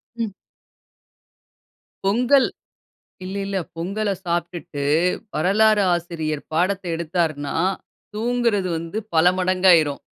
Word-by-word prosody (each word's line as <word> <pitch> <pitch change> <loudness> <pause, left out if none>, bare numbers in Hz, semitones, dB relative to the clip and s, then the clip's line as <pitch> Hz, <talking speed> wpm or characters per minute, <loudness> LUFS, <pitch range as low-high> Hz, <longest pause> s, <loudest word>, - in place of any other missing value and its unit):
ம். 230 -3 -3 1.7
பொங்கல் 250 +7 +4 0.8
இல்ல 190 +2 -5
இல்ல. 200 0 -3 0.2
பொங்கல 200 +5 -2
சாப்ட்டுட்டு 170 -4 -3 0.5
வரலாறு 210 +5 +3
ஆசிரியர் 160 -3 -3
பாடத்த 185 +4 +1
எடுத்தாருன்னா, 160 -4 -2 0.6
தூங்குறது 230 -3 0
வந்து 165 +6 -5 0.2
பல 160 +1 +4
மடங்காயிரும். 180 -5 +3
185 Hz, 85 wpm, -22 LUFS, 165-210 Hz, 1.7 s, பொங்கல்